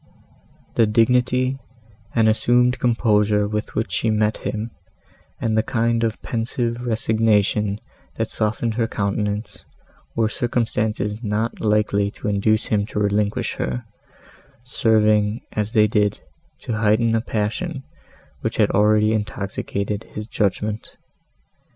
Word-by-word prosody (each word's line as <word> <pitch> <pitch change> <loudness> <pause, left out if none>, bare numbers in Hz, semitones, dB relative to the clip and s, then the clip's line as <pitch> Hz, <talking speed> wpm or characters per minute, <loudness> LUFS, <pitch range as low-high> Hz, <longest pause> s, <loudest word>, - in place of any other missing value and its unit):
The 115 - +5
dignity 125 +4 +2 0.6
and 110 -2 +4
assumed 120 +3 +3
composure 105 -3 +2
with 105 +1 -4
which 110 -4 -1
she 110 +5 0
met 105 0 +1
him, 110 +2 -4 0.7
and 110 -1 0
the 110 - +4
kind 115 0 0
of 115 -1 -1
pensive 115 0 -2
resignation, 110 -3 +1 0.4
that - - -1
softened 110 +2 -1
her 115 0 0
countenance, 105 0 -2 0.5
were 115 -1 +2
circumstances 110 -3 -1
not 110 +1 -2
likely 105 -1 +2
to - - -5
induce 105 +2 +2
him 105 -1 0
to 105 - -3
relinquish 105 0 0
her, 60 -1 -3 0.8
serving, 110 -4 +2
as 105 +1 -2
they 105 -3 +5
did, 105 -1 +1 0.4
to 115 - -3
heighten 110 +1 +3
a 115 - +2
passion, 130 - -2 0.6
which - - -3
had - - +3
already 105 +1 +4
intoxicated 105 0 -3
his 105 0 -7
judgment. 105 0 -2
110 Hz, 120 wpm, -22 LUFS, 105-115 Hz, 0.8 s, The